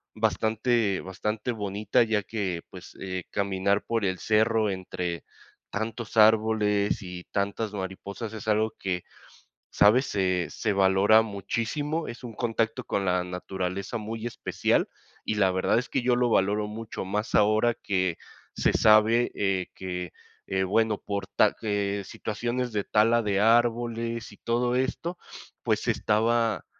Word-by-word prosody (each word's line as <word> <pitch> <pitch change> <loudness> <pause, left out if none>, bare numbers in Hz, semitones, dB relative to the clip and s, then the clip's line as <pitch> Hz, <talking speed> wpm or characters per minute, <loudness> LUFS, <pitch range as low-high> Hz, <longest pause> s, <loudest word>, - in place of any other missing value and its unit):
bastante 110 -1 +1
bastante 105 +5 -3
bonita, 105 +2 +1
ya 110 -2 +1
que, 95 -5 -3
pues, - - -12
eh, 95 -2 -4
caminar 100 0 +1
por 115 -3 0
el 95 -1 -1
cerro 110 0 +2
entre 90 -2 -4 0.5
tantos 110 +1 -4
árboles 105 -1 +3
y 90 -2 -7
tantas 100 +2 -2
mariposas 100 +3 -5
es 110 -1 -8
algo 110 +1 +2
que, 90 -2 -2 0.7
¿sabes?, 120 +7 +5
se 90 -5 0
se 110 - -2
valora 100 +2 +5
muchísimo, 115 - -3
es 120 +2 -8
un 120 - -7
contacto 115 0 -1
con 100 - -1
la 90 -1 +1
naturaleza 95 +3 -4
muy 110 +1 -5
especial, - - 0 0.4
y 110 - -1
la 95 -3 +3
verdad 95 +4 +1
es 125 - -2
que - - 0
yo 125 0 +2
lo 120 -1 +2
valoro 105 +1 +2
mucho 110 +1 -6
más 105 +3 -2
ahora 110 +3 +4
que 95 -3 -1 0.4
se - - +2
sabe, 110 +3 +5
eh, 95 -2 0
que, 90 -2 -5 0.3
eh, 95 0 0
bueno, 105 +3 +2
por 100 -1 -4
ta - - +3
eh, 100 -1 -1
situaciones 120 +5 -3
de 105 -2 -2
tala 115 +2 +3
de 100 -1 +1
árboles 115 0 +1
y 100 - -15
todo 120 +1 0
esto, 165 +7 -2 0.5
pues - - +1
se - - +1
estaba, 115 +1 +1
105 Hz, 145 wpm, -27 LUFS, 95-115 Hz, 0.7 s, sabes